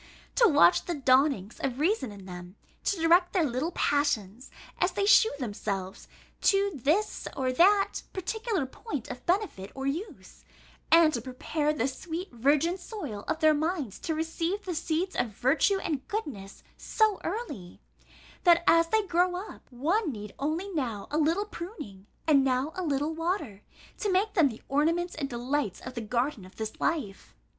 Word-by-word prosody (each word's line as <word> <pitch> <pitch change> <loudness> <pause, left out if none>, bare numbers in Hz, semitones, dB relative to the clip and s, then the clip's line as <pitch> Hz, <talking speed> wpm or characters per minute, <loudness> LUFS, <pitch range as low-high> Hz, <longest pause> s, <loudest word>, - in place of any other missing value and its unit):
To 475 - +5
watch 180 - +5
the 345 - -2
dawnings 260 -6 +2
of 260 -2 -2
reason 315 - +1
in 200 -2 -11
them, 180 0 -9 0.3
to 395 - 0
direct 345 +2 +4
their 365 -4 +3
little 275 +4 -1
passions, 255 -5 0 0.3
as - - +2
they 400 - 0
shew 420 +2 +6
themselves, 200 -6 -4 0.3
to 400 0 +3
this 315 - 0
or 260 -1 0
that 390 +8 +4
particular 410 - -2
point 270 - -6
of 245 - -9
benefit 355 - -1
or 270 0 -4
use; 285 - -5 0.5
and 330 -2 +7
to 235 - -1
prepare 290 +5 -2
the 280 -4 0
sweet 330 +7 -5
virgin 290 +9 +2
soil 300 - -6
of 315 - -2
their 310 -1 +6
minds 300 - -2
to 320 - -2
receive 330 +5 -2
the 365 - -2
seeds 335 +3 -1
of 235 -4 -1
virtue 290 +10 +3
and 300 -8 -3
goodness 255 - -5
so 435 -3 +1
early, 335 - -5 0.6
that, 340 -1 +5
as 330 0 +5
they 435 +4 +1
grow 355 0 +2
up, 385 +4 -8
one 320 - 0
need 210 -3 -8
only 315 +7 -1
now 235 - -3
a 300 - +1
little 330 +7 +2
pruning, 335 - -9 0.2
and 285 -4 +5
now 265 +3 0
a 370 - -3
little 295 -1 -1
water, 325 - -3 0.4
to 415 - 0
make 395 +3 +1
them 325 -7 +4
the 225 - -10
ornaments 335 +5 +1
and 280 -3 -4
delights 245 -3 -2
of 255 - -7
the 235 - -4
garden 235 +1 -1
of 185 - -14
this 220 -1 -5
life! 265 - -2
300 Hz, 170 wpm, -28 LUFS, 245-360 Hz, 0.6 s, and